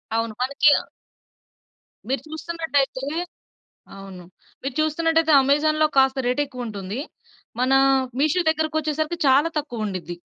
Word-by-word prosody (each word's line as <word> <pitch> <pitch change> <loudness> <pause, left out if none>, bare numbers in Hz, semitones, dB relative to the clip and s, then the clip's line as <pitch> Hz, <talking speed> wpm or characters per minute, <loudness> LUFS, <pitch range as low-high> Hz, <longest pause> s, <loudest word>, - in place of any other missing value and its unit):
అవును. 225 -1 -1
మనకి‌ 280 +3 +3
ఆహ్ - - -18 1.2
మీరు 270 - -1
చూస్తున్నట్టయితే 315 -5 -2 0.9
అవును. 190 -2 -11 0.4
మీరు 270 -1 -4
చూస్తున్నట్టయితే 325 +1 +1
అమెజాన్‌లో 310 +3 +2
కాస్త 265 0 +4
రేట్ 250 +4 +1
ఎక్కువ 250 -3 -7
ఉంటుంది. 205 +2 -5 0.6
మన 260 +1 +2 0.5
మీషో 310 +5 +2
దగ్గరకి 315 0 -2
వచ్చేసరికి 310 +2 -2
చాలా 280 +5 +4
తక్కువుండిద్ది. 210 - -5
280 Hz, 110 wpm, -23 LUFS, 245-310 Hz, 1.2 s, కాస్త